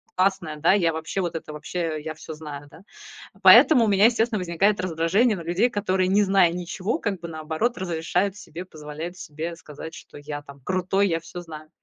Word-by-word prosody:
классная, 185 -5 0
да, 160 +5 +4
я 175 -5 +3
вообще 160 +4 -3
вот 175 -2 -3
это 155 -1 -6
вообще, 160 0 -3
я 155 0 -4
всё 155 +1 -9
знаю, 150 -2 -8
да". 160 - -15 0.6
Поэтому 255 -7 +8
у - - 0
меня, 200 -1 +3
естественно, 230 -2 +2
возникает 185 +4 +1
раздражение 185 +6 +1
на - - -6
людей, 175 +9 +1
которые, 190 -4 0
не 205 +2 +4
зная 190 -3 +4
ничего, 180 +4 -3
как 200 -4 -2
бы 170 - -6
наоборот, 160 +9 -2
разрешают 180 +2 -1
себе, 180 -3 -9
позволяют 155 +1 -8
себе 165 +1 -6
сказать, 160 0 -10
что: - - -13
"Я 145 0 -6
там 140 -1 -13
крутой, 185 +2 +1
я 165 -3 0
всё 175 - -9
знаю". 155 -2 -10
175 Hz, 195 wpm, -24 LUFS, 160-195 Hz, 0.6 s, Поэтому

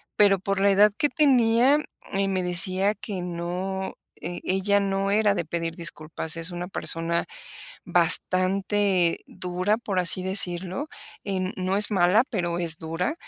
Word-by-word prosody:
pero 200 -1 +4
por 195 +1 -2
la 200 - +4
edad 205 +1 +5
que 295 - +1
tenía, 260 -2 +3 0.3
eh, 195 0 0
me 185 -1 -1
decía: 185 +3 +1
"Que 200 -4 -6
no, 180 +2 -4 0.2
e 175 +1 -6
ella 195 +2 +1
no 195 0 -1
era 205 -1 +2
de 170 - -2
pedir 165 0 -4
disculpas", 160 -1 -5
es 165 +2 0
una 175 0 -6
persona 170 -2 -2 0.6
bastante 190 -1 +2
dura, 185 +3 -2
por 200 -5 -2
así 180 +1 0
decirlo, 190 - +2 0.3
eh, 195 -2 -3
n 185 0 -2
no 185 +1 -1
es 210 +1 +5
mala, 190 +6 +4
pero 175 -6 -2
es 170 -2 -3
dura, 165 - -3
190 Hz, 155 wpm, -25 LUFS, 175-200 Hz, 0.6 s, edad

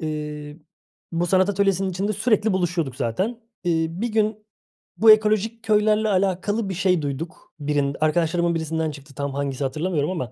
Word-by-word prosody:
Eee, 150 -1 -5 0.5
bu 170 +1 0
sanat 185 +2 +3
atölyesinin 195 -1 +1
içinde 195 +4 -1
sürekli 215 0 +2
buluşuyorduk 175 -7 -1
zaten. 190 - -2 0.2
Eee, 165 -2 +1
bir 195 +8 -3
gün 215 -1 0 0.5
bu 220 0 +8
ekolojik 215 +1 +2
köylerle 215 0 +3
alakalı 195 +2 0
bir - - -2
şey 180 -2 +2
duyduk. 145 +3 -6
Birin 145 -1 0
arkadaşlarımın 170 +2 +1
birisinden 160 0 -1
çıktı 140 -1 -13
tam 140 -1 -3
hangisi 140 -1 -2
hatırlamıyorum 155 +3 -1
ama, 130 -9 -4
175 Hz, 150 wpm, -23 LUFS, 150-210 Hz, 0.5 s, bu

